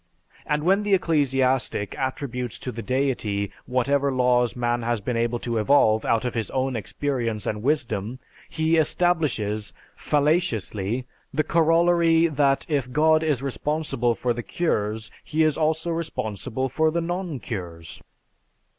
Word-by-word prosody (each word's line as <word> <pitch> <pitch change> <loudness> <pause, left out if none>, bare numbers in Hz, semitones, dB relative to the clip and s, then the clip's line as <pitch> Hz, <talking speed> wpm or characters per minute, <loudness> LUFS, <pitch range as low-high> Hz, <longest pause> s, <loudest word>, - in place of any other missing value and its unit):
And 150 0 0
when 195 +4 +3
the 205 -1 +3
ecclesiastic 135 - +1
attributes 125 -3 -3
to 125 - -5
the 115 - -6
Deity 115 -7 -1 0.2
whatever 140 +3 +1
laws 125 -2 +2
man 120 0 0
has 120 0 -1
been 120 +4 -3
able 120 +1 0
to 115 -1 -2
evolve 110 -3 +3
out 115 +1 +1
of 125 - -2
his 115 -2 -2
own 130 -1 -1
experience 115 0 -2
and 105 -1 -2
wisdom, 120 -5 -1 0.3
he 160 +1 +1
establishes, 150 - 0 0.2
fallaciously, 130 - 0 0.3
the 155 - +1
corollary 165 0 +3
that 140 -3 +1
if 140 -5 -1
God 155 +3 +4
is 150 -5 0
responsible 140 -3 -1
for 120 +1 0
the 120 - -4
cures, 110 -8 -2
He 160 +1 +1
is 155 -2 +2
also 160 +2 0
responsible 130 - -3
for 160 +5 +1
the 170 +2 -1
non 175 -2 -3
cures. 85 -9 -7
130 Hz, 140 wpm, -24 LUFS, 115-155 Hz, 0.3 s, God